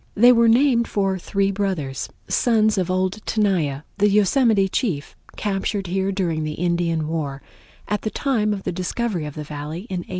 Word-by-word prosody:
They 240 +4 +7
were 235 -1 +5
named 235 0 +4
for 195 -2 0
three 195 +2 0
brothers, 185 -9 -2 0.2
sons 220 -4 +2
of 185 -1 -1
old 185 +3 -1
Tenaya, 175 -10 0 0.2
the 205 +1 +4
Yosemite 210 0 +3
chief, 185 - -2 0.2
captured 200 0 -2
here 190 +2 -1
during 170 -5 -1
the 155 0 -3
Indian 170 -2 0
War, 145 -4 -3 0.4
at 210 - -1
the 215 - -2
time 215 -2 0
of 200 -2 -3
the - - -2
discovery 185 -1 -2
of 150 - -8
the 150 - -5
Valley 150 +3 -6
in 185 - -2
1852. 175 - -9
195 Hz, 175 wpm, -22 LUFS, 165-215 Hz, 0.4 s, They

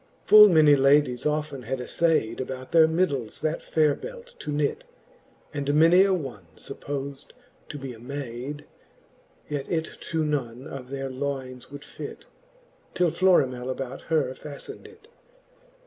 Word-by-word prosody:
XXVIII. - - -22
Full 210 0 +11
many 155 -4 +6
ladies 135 -2 +3
often 150 -2 -2
had 130 +3 -3
aflayd, 125 -3 0
About 130 0 -6
their 160 -1 +6
middles 150 -9 -1
that 155 +1 -1
faire 155 -2 +2
belt - - -9
to - - -5
knit; 145 -1 -1 0.7
And 145 0 -1
many 165 +4 +6
a 195 - +2
one 125 - -7
fuppos'd 140 0 -6 0.4
to 145 - -6
be 135 -2 -7
a 115 - -13
mayd; 135 +2 -6 0.8
Yet 145 -2 -4
it 160 -2 0 0.2
to 160 -1 0
none 130 -4 -3
of 135 -2 -7
all - - -16
their 135 -1 -4
loynes 130 -2 -5
would 145 0 -9
fit, - - -9 0.7
Till 175 -2 +2
Florimell 130 -10 +2
about 130 0 -5
her 150 -6 +1
faftned 150 - -10
it. 440 - -18
140 Hz, 150 wpm, -26 LUFS, 130-155 Hz, 0.8 s, Full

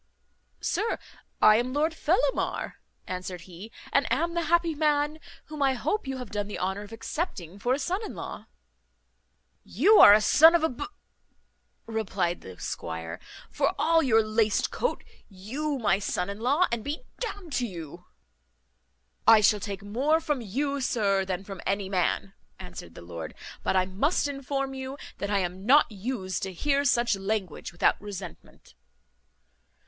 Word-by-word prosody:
"Sir, 440 +3 0 0.5
I 215 0 +8
am 250 +2 -1
Lord 310 +3 +1
Fellamar," 365 +10 0 0.3
answered 180 -1 -5
he, 185 +5 -11 0.2
"and 280 - +2
am 335 +5 +1
the 340 -1 -1
happy 340 0 +2
man 300 0 +1 0.3
whom 305 -1 -7
I 270 -1 +4
hope 415 - -2
you 265 0 -3
have 250 -4 -7
done 205 -1 -2
the 205 - -5
honour 190 +2 -2
of 205 +1 -11
accepting 220 - -5
for 245 +5 +1
a - - -3
son 370 +8 -2
in - - -6
law." - - -7 1.2
"You 430 +1 +4
are - - +11
a 210 - +7
son 320 +10 +7
of 335 - +2
a 320 - +3
b 245 - -5 0.5
," - - -45
replied 200 -6 -2
the 90 -2 -11
squire, 80 -1 -5 0.3
"for - - 0
all 330 0 +4
your 225 -6 +4
laced 215 -1 +1
coat. - - -2 0.3
You 260 +10 -3
my 205 -5 +2
son 185 -1 -2
in 200 - -8
law, 280 +10 +3
and 235 -2 -2
be 290 +3 -4 0.2
d - - -1
n'd 340 -7 -11
to 245 - 0
you!" 170 -2 -9 1.2
"I 225 -1 +9
shall 210 0 +4
take 200 -1 -5
more 265 +10 +1
from 295 -5 -2
you, 275 +6 -2
sir, 200 -6 +1
than 185 0 -3
from 195 -2 -8
any 195 0 -1
man," 195 +1 0 0.2
answered 180 - -10
the - - -10
lord; 85 -2 -7 0.3
"but - - 0
I 185 -1 +4
must 270 - 0
inform 275 -1 -3
you 265 +1 -6 0.2
that 200 - -3
I 205 - +2
am 180 +1 -4
not 270 +3 +5
used 200 -2 -3
to 190 -2 -3
hear 280 - +1
such 240 -4 +3
language 195 -3 -3
without 175 - +2
resentment." 190 - -9
220 Hz, 170 wpm, -27 LUFS, 190-290 Hz, 1.2 s, are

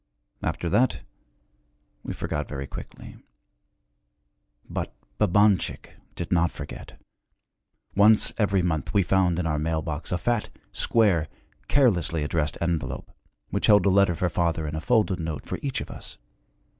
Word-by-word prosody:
After 85 - -2
that, 110 +9 +2 1.0
we - - -6
forgot - - -3
very 70 -1 -5
quickly. - - -10 1.5
But - - -4 0.2
Babanchik 100 -2 +2 0.2
did 85 -1 -5
not 85 -1 +3
forget. - - -9 1.0
Once 105 +2 +5
every 100 -3 +2
month 80 0 -2
we 100 - +5
found 90 -2 +2
in 90 - -1
our 75 -2 0
mail 80 0 -1
box 80 0 -4
a 90 - +1
fat, 120 +4 -1 0.2
square, 95 -9 +2 0.4
carelessly 90 - +2
addressed 75 0 -1
envelope, 85 -7 -2 0.4
which - - 0
held 105 -3 +6
a - - +5
letter 100 -2 +4
for 90 - 0
father 85 -2 0
and 75 +1 -4
a 80 - -3
folded 105 -2 +2
note 80 -3 -4
for - - -4
each 135 -2 -2
of - - -7
us. - - -8
85 Hz, 145 wpm, -26 LUFS, 80-100 Hz, 1.5 s, held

